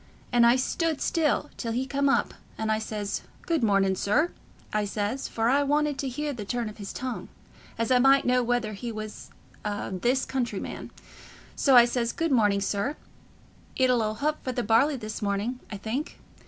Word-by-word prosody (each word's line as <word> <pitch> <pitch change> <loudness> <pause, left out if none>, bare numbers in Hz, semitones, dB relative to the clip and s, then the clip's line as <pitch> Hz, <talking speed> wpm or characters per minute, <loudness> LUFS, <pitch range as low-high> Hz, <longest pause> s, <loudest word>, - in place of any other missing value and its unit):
And 240 -1 +5
I 240 - +6
stood 315 +4 0
still 300 -2 +1
till 230 -2 -3
he 255 +3 0
come 280 +1 +1
up, 275 - +2 0.2
and 220 0 -1
I 215 - +1
says, 210 -2 -3 0.2
'Good 330 -2 0
morning, 195 -3 +3
sir,' 295 - +1 0.4
I 210 0 +1
says, 205 +5 -2
for 225 0 -1
I 275 +4 +4
wanted 290 0 +1
to 275 - -1
hear 295 +3 -3
the 225 -5 -6
turn 235 +2 -2
of 215 - -12
his 200 -2 -6
tongue, 255 -2 -5 0.5
as 230 +1 -1
I 250 - +6
might 270 +2 +5
know 250 0 +3
whether 240 -3 0
he 235 +4 -5
was 215 -1 -7 0.3
a 205 -1 -3
this 240 +8 +1
country 240 -6 -2
man; - - -6 0.7
so 270 -3 +4
I 240 -1 +9
says, 240 -1 -1
'Good 330 -2 -1
morning, 205 -5 +3
sir: 205 +8 -1 0.8
it 255 -1 +3
'll 245 -2 +3
'old 215 0 -1
hup 305 +1 0
for 255 - -2
the 245 - -1
barley 230 +8 +3
this 215 -4 -6
morning, 205 +5 -1
I 205 - -4
think. 230 - -4
240 Hz, 195 wpm, -27 LUFS, 215-270 Hz, 0.8 s, I